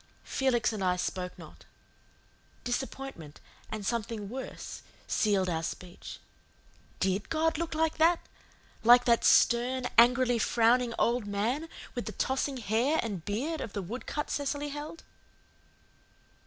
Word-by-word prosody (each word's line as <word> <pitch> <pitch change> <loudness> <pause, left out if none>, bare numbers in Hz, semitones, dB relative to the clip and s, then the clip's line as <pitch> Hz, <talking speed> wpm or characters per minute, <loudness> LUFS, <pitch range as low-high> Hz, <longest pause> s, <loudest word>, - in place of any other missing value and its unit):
Felix 250 -4 +1
and 205 -3 -3
I 180 -1 +2
spoke 180 0 -3
not. - - -13 1.0
Disappointment, 245 - -5 0.3
and 215 -2 -5
something 220 -2 -2
worse, 260 +3 -7 0.2
sealed 200 -3 +1
our 165 -2 -1
speech. 175 +2 -7 0.8
DID 190 +2 0
God 320 0 +1
look 335 -1 -3
like 320 0 0
that 335 +2 +5 0.6
like 245 +2 +7
that 235 -1 +3
stern, 250 +2 +4
angrily 245 0 +5
frowning 235 +2 +3
old 235 -2 +1
man 235 +11 -1 0.2
with - - -4
the - - -4
tossing 265 +1 -1
hair 240 +7 +1
and 200 -7 -4
beard 280 +11 -2
of 210 - -6
the 200 - -3
wood 230 +8 -7
cut 295 0 -3
Cecily 285 0 -2
held. 295 +3 -7
240 Hz, 130 wpm, -30 LUFS, 205-270 Hz, 1.0 s, like